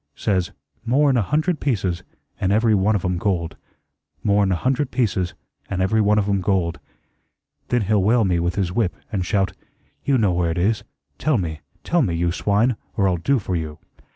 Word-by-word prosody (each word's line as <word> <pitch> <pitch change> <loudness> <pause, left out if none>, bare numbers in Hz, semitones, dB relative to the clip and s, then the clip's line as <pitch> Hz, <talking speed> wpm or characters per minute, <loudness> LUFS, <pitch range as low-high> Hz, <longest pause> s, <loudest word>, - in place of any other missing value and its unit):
Says 95 -4 0 0.3
'More'n 135 +3 +3
a 120 - +3
hundred 155 - 0
pieces, 95 -10 -1 0.4
an' 95 - 0
every 110 +2 +3
one 105 +2 +3
of 95 - -1
'em 90 -1 0
gold. 85 -4 -1 0.7
More'n 100 -1 +3
a - - +2
hundred 130 +7 0
pieces, 100 -9 0 0.3
an' 95 - -2
every 110 +4 +2
one 105 0 +3
of 105 -1 +1
'em 100 -1 +1
gold.' 90 -3 0 0.9
Then 120 -2 +1
he'll 105 0 +2
whale 110 +3 +3
me 90 -2 +1
with 85 +1 -1
his 95 -3 0
whip, 95 -2 0 0.2
and 100 -4 -1
shout, 95 +2 0 0.5
'You 140 -2 +2
know 105 -6 +2
where 85 -1 +1
it 80 - -2
is. 105 +5 +1 0.4
Tell 155 -4 +2
me, 80 -6 -3 0.2
tell 175 0 +2
me, 90 - 0
you 85 +1 +1
swine, 105 +6 +1 0.2
or 100 - +3
I'll 90 -2 +1
do 135 +12 +1
for 95 -5 -3
you.' 80 -2 -4
100 Hz, 195 wpm, -22 LUFS, 90-115 Hz, 0.9 s, More'n